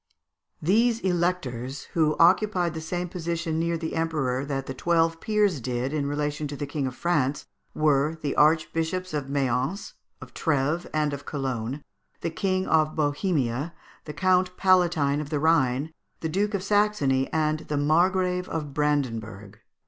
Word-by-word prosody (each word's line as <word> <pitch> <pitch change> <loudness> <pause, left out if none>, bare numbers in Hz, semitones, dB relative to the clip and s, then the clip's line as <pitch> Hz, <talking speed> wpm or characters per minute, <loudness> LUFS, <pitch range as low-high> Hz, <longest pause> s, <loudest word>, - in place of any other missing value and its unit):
These 225 +7 +3
Electors 165 -8 -1
who 155 -2 +2
occupied 180 0 +3
the 160 - -5
same 175 +2 -3
position 170 -2 -3
near 170 0 0
the 160 0 -4
Emperor 150 -6 -1
that 135 -1 -3
the 130 - -5
twelve 165 +3 +1
peers 210 -7 +1
did 125 +3 -2
in 145 -2 -1
relation 150 +1 -2
to 145 - -6
the 145 - -4
King 145 -1 -2
of 125 - -6
France 150 -5 0 0.3
were 150 +1 +2
the 145 -2 -2
Archbishops 165 +3 +1
of 145 -3 -3
Mayence, 135 - -1 0.3
of - - -12
Trèves, 150 +2 0
and 150 -1 0
of 140 0 -7
Cologne, 135 -1 -3 0.4
the 165 - -2
King 185 +2 0
of 155 -1 +2
Bohemia, 145 - -1 0.3
the 150 - -6
Count 180 +3 +2
Palatine 170 -6 +3
of 150 - -7
the 150 - -1
Rhine, 150 -2 +2 0.3
the 160 - -2
Duke 205 +5 0
of 190 - -2
Saxony, 200 -11 +2
and 155 -1 +1
the 150 - -1
Margrave 180 +4 +2
of 150 -3 -4
Brandenburg. 115 -9 -2
155 Hz, 155 wpm, -26 LUFS, 140-175 Hz, 0.4 s, These